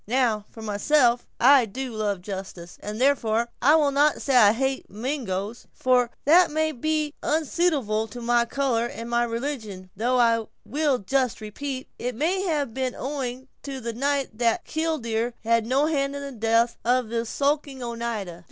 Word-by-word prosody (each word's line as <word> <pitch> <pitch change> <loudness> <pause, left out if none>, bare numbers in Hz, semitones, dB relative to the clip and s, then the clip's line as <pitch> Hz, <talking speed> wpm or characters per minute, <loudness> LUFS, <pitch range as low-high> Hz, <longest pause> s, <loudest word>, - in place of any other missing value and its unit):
Now, 230 -3 +1
for 225 - -11
myself, 240 +4 +2
I 260 -1 +6
do 255 +4 -5
love 205 -4 -2
justice; 190 -3 -7
and, 210 +2 -5
therefore, 235 -4 +2
I 290 +5 +6
will 295 -3 +3
not 290 +2 +3
say 275 - 0
I 215 -5 +7
hate 265 +4 -1
a - - -20
Mingo, 220 -4 -3 0.2
for 250 -1 +2 0.2
that 340 +5 +6
may 315 +1 0
be 305 +2 -1
unsuitable 300 -8 0
to 225 +3 -9
my 240 0 +2
color 240 -2 0
and 230 -1 -7
my 240 0 +2
religion, 230 -6 -4
though 245 +5 +1
I 230 -2 +3 0.2
will 290 -2 +1
just 255 +2 0
repeat, 260 +5 -5
it 245 0 -3
may 340 +9 0
have 290 -8 -1
been 260 0 -2
owing 260 -2 -4
to 275 -2 -6
the 235 -1 -4
night 275 -2 -1
that 240 +8 +1
'killdeer' 245 -8 -2
had 230 0 +2
no 270 +4 +2
hand 280 -3 0
in 280 - -5
the 280 - -6
death 230 0 +1
of 245 -1 +1
this 230 0 -2
skulking 280 -2 -1
Oneida." 230 -7 -4
245 Hz, 170 wpm, -25 LUFS, 225-280 Hz, 0.2 s, I